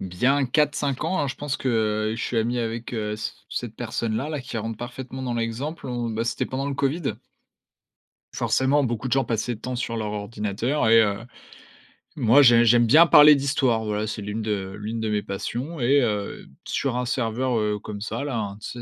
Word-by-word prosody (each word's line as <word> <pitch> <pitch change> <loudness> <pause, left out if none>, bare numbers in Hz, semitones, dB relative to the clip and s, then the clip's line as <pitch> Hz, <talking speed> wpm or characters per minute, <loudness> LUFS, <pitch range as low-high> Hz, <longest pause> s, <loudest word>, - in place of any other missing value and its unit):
bien 125 +10 +1
4-5 145 0 0
ans 185 - -1
hein, 145 - 0
je - - -4
pense, 145 -1 -3
que 110 -3 0
je - - -5
suis 120 - -2
ami 120 +2 0
avec, 115 +1 -4
heu, 105 -2 -2
c 110 0 -4 0.2
cette 115 -3 -5
personne-là, 115 +3 -3
là. 150 -3 -3
Qui 115 - -5
rentre 110 0 -4
parfaitement 130 +2 -7
dans 125 - -2
l'exemple 120 +8 -3
en 120 -2 -2
bah, 110 +1 -2
c'était 120 - -1
pendant 135 +2 -3
le 140 - -2
Covid. 140 +2 -1 1.2
Forcément, 135 +2 +2
beaucoup 120 -1 -2
de - - -6
gens 135 +1 +3
passaient 120 +1 -1
de 110 - -14
temps 125 0 -4
sur 115 -1 -3
leur 105 -1 -3
ordinateur 105 +5 -1
et 115 0 +7
heu, 100 -1 0 1.0
moi 120 +5 +5
j'ai 120 -2 +6
j'aime 120 +1 +5
bien 160 +8 +7
parler 150 -1 +9
d'histoire, 135 -5 +1
voilà, 105 0 -2
c'est 110 - -4
l'une 105 +2 -4
de 100 -3 -3
l'une 110 +2 -4
de 110 -1 -2
mes 105 -1 0
passions, 125 +10 -5
et 135 +3 +4
heu, 105 -4 -2 0.2
sur 130 -3 -1
un 125 - -1
serveur, 120 +1 -1
heu, 105 -1 0
comme 105 0 -7
ça 140 +6 -4
là, 135 -5 -2
hein, 100 -2 -4
tu - - -6
120 Hz, 205 wpm, -24 LUFS, 110-135 Hz, 1.2 s, parler